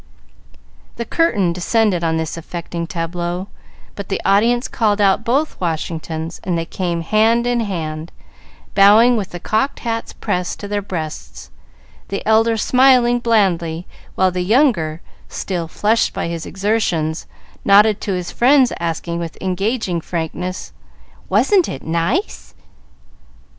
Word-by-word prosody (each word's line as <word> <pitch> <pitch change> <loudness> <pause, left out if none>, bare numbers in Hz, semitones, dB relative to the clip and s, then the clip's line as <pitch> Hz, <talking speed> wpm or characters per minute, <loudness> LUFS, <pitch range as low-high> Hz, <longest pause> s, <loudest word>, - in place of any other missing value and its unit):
The 235 - -4
curtain 205 - +1
descended 185 0 +1
on 160 -1 +1
this 160 -1 -3
affecting 170 0 -6
tableau; 175 +3 -4 0.4
but 200 -2 -8
the 195 - -1
audience 235 +5 +3
called 215 -3 0
out 200 +1 +3
both 275 +4 -1
Washingtons, 160 -1 -4
and 175 -2 -1
they 165 - -2
came, 170 -1 -3
hand 220 +6 +2
in 245 0 +1
hand, 165 -6 -4 0.6
bowing 215 +5 +6
with 205 -5 -2
the 175 - -7
cocked 220 +9 -1
hats 230 -1 -3
pressed 180 -4 -3
to 205 - -6
their 205 0 -2
breasts, 160 -6 -7 0.6
the 200 - -5
elder 225 +1 +3
smiling 250 0 +4
blandly, 180 -8 +1 0.3
while 185 -1 +2
the 180 0 -2
younger, 180 - +2 0.3
still 175 -4 -3
flushed 215 +7 +1
by - - -3
his 170 -1 -5
exertions, 190 -6 -1 0.4
nodded 205 +1 +5
to 200 - -2
his 180 -1 -4
friends, 260 +1 +4
asking, 170 0 -3
with 165 -2 -6
engaging 190 -1 -1
frankness, 175 +3 -4 0.6
"Wasn't 390 -5 +3
it 135 - -6
nice?" 150 - -2
190 Hz, 130 wpm, -19 LUFS, 170-225 Hz, 0.6 s, bowing